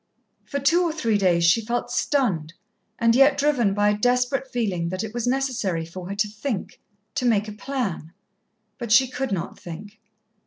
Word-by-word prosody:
For 280 - -3
two 320 +6 +3
or 345 -2 +1
three 230 -10 0
days 175 -3 +3
she 170 +7 +4
felt 240 +2 -2
stunned, 185 - 0 0.4
and 230 0 +3
yet 275 +2 +5
driven 265 -9 +2
by 205 0 +3
a - - 0
desperate 250 +4 +1
feeling 195 -9 -2
that 185 +3 -3
it 220 0 -6
was 240 0 -2
necessary 245 -10 -1
for 180 +2 -9
her 200 - -4
to 205 +1 +1
think, 210 +1 -5 0.3
to 280 - -2
make 220 -3 +2
a - - -5
plan. 210 - -4 0.7
But 235 -3 -5
she 260 +3 +6
could 255 +1 -4
not 175 -3 -4
think. 200 +6 -10
230 Hz, 185 wpm, -24 LUFS, 195-260 Hz, 0.7 s, she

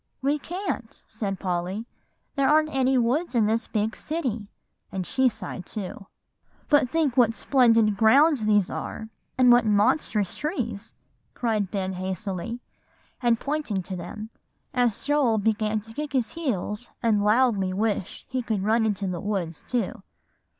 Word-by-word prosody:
"We 285 +2 +2
can't," 350 - -5
said 200 -4 -4
Polly; 185 +3 -2 0.5
"there 275 -1 +2
aren't 310 0 +3
any 265 0 +3
woods 255 +6 +1
in 225 -3 +4
this 225 +3 0
big 220 0 -1
city;" 250 -10 -3 0.4
and 190 -1 -3
she 260 +3 +2
sighed 195 -4 -8
too. 195 -1 -6 0.6
"But 290 -4 +4
think 300 -4 +1
what 230 -3 +4
splendid 230 -6 +3
grounds 265 +3 +5
these 205 -3 +3
are, 220 - -5 0.3
and 250 -1 +6
what 240 0 +6
monstrous 210 - +2
trees," 240 - -4 0.4
cried 215 -5 0
Ben 190 -2 -2
hastily, 190 +5 -4 0.6
and 235 -2 +3
pointing 280 -10 -2
to 185 - -6
them, 210 +5 -7 0.4
as 245 -5 +1
Joel 285 -6 +2
began 215 0 0
to 225 +2 -13
kick 295 +3 -5
his 250 -4 +1
heels 245 - -3
and 215 -3 +3
loudly 210 -3 +3
wish 205 -1 -2
he 255 0 -2
could 220 -5 -2
run 220 +2 +3
into 205 -2 -1
the 180 -2 -3
woods 185 -6 -3
too. 235 -6 -2
225 Hz, 150 wpm, -25 LUFS, 205-255 Hz, 0.6 s, and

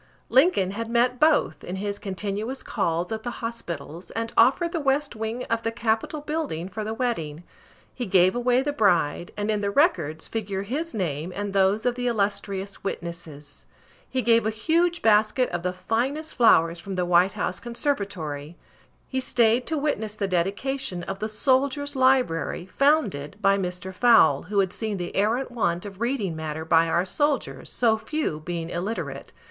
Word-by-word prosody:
Lincoln 255 - +4
had 230 +3 -4
met 245 +1 +2
both, 310 -1 +3
in 180 - -5
his 200 +1 -3
continuous 205 +5 -4
calls 175 -4 -1
at 220 0 -3
the 240 - -4 0.2
hospitals, 170 -7 -6
and 230 0 -4
offered 275 +9 +4
the 340 - -1
west 280 -1 0
wing 220 +3 -3
of 230 0 -1
the 225 - -1
Capitol 230 +5 -1
building 295 - -3
for 215 +3 -5
the 220 +1 -3
wedding. 175 -11 -2 0.5
He 245 -3 -4
gave 185 +1 +4
away 245 +1 +2
the 290 +1 -1
bride, 175 - +2
and 205 +1 0
in 210 -1 0
the 200 - 0
records 170 - +1
figure 200 -3 -3
his 295 +10 -4
name 165 -3 -2
and 205 -1 -3
those 195 +3 +2
of 245 - +2
the 245 0 -3
illustrious 200 -3 -2
witnesses. 165 -6 -7 0.4
He 260 -1 -1
gave 230 0 +4
a - - +2
huge 335 +10 +1
basket 220 +3 +3
of 175 - -2
the 180 +1 -1
finest 255 +12 -2
flowers 170 -8 +4
from 195 +2 -6
the 180 -1 0
White 180 +2 +4
House 185 -2 -2
conservatory. 195 - -3 0.5
He 260 - -2
stayed 240 -1 +2
to 320 - -1
witness 220 -8 -2
the 205 -2 -1
dedication 195 +3 -1
of 195 +2 -5
the 215 - -2
Soldier's 275 +5 +1
Library, 255 -11 +2
founded 205 - +1
by 195 -1 +4
Mr. 180 0 -4
Fowle, 240 +5 +5
who 210 - -2
had 190 -2 -2
seen 220 -3 -3
the 175 -1 -5
arrant 230 +6 +1
want 180 -6 -1
of 200 +1 -9
reading 235 -8 -1
matter 160 0 -4
by 165 0 +4
our 175 +2 +1
soldiers 230 - -1
so 225 -2 +2
few 300 - -2
being 170 +1 -5
illiterate. 195 +6 -4
210 Hz, 175 wpm, -25 LUFS, 180-250 Hz, 0.5 s, Fowle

